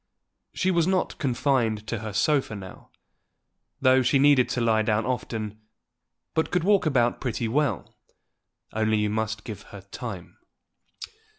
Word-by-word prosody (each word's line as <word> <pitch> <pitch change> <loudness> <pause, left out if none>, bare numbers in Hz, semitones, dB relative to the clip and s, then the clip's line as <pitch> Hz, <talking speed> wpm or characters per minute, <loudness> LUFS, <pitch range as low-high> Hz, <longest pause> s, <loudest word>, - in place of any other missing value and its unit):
She 190 - 0
was 170 -2 +2
not 185 -1 0
confined 125 -5 0
to 115 0 -3
her 110 0 -5
sofa 135 +2 +1
now, 95 -2 -10 0.9
though 130 0 +5
she 130 +2 +3
needed 140 -2 +5
to - - -1
lie 115 -2 +3
down 110 0 +1
often, 110 -4 -3 0.7
but 160 - 0
could 180 -2 0
walk 200 -3 +3
about 120 -5 +1
pretty 120 -2 -2
well, 130 - -1 0.8
only 110 0 +1
you 105 -1 0
must 110 -1 -2
give 110 -5 -7
her 100 - -10
time. 95 -1 -8
115 Hz, 140 wpm, -26 LUFS, 110-140 Hz, 0.9 s, though